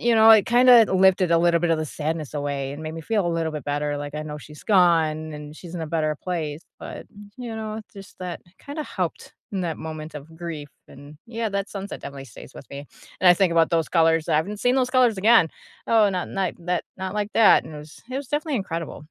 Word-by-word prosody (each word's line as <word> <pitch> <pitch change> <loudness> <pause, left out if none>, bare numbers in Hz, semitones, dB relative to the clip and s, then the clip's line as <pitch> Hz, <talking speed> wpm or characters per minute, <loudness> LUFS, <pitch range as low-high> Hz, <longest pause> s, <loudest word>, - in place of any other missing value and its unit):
you 235 -1 +3
know, 220 0 +7
it 215 -3 +7
kinda 240 -2 +7
lifted 185 -1 +4
a 165 - +5
little 170 0 +3
bit 175 -1 +1
of 160 - +2
the 155 - -1
sadness 155 0 -4
away 140 -2 -3
and 145 +2 -8
made 155 +1 -5
me 165 - -6
feel 205 0 0
a - - +1
little 165 -1 -1
bit 150 -4 -6
better, 145 0 -1
like, 145 0 -6
I 150 - -3
know 150 -1 -7
she's 150 +1 -13
gone, 160 -5 +3
and 150 +1 -9
she's 175 -1 -10
in 170 - -4
a - - -4
better 155 -2 0
place, 160 -4 -3 0.2
but, - - -9
m 205 0 -14
you 235 -3 -6
know, 220 0 -5
just 195 -1 -13
that 180 -2 -5 0.2
kinda 295 +1 -6
helped 180 -8 -5 0.2
in 190 -2 -2
that 165 -2 -3
moment 155 -1 -7
of 155 +3 -10
grief 160 -4 -6 0.2
and 145 +2 -13
yeah, 230 -1 -3
that 200 0 -3
sunset 200 0 -6
definitely 140 -1 -8
stays 120 +3 -13
with - - -12
me 140 +1 -8 0.3
and 185 - +6
I 175 - +10
think 190 -1 +2
about 165 -1 +3
those 165 -2 +1
colors, 165 -2 +2
I - - +3
haven't 200 +6 -2
seen 245 +1 +2
those 255 -1 +1
colors 250 -5 +3
again. 215 -4 +5 0.4
Oh, 220 -3 +4
not 180 -1 -3
not 190 -3 -1
that 180 -1 0
not 190 +1 -4
like 210 0 -2
that 225 -2 +6
and 155 - -10
it - - -7
was 150 +1 -13
it 260 - -3
was 275 -2 -5
definitely 295 -1 -1
incredible. 165 -5 -4
170 Hz, 245 wpm, -24 LUFS, 155-210 Hz, 0.4 s, I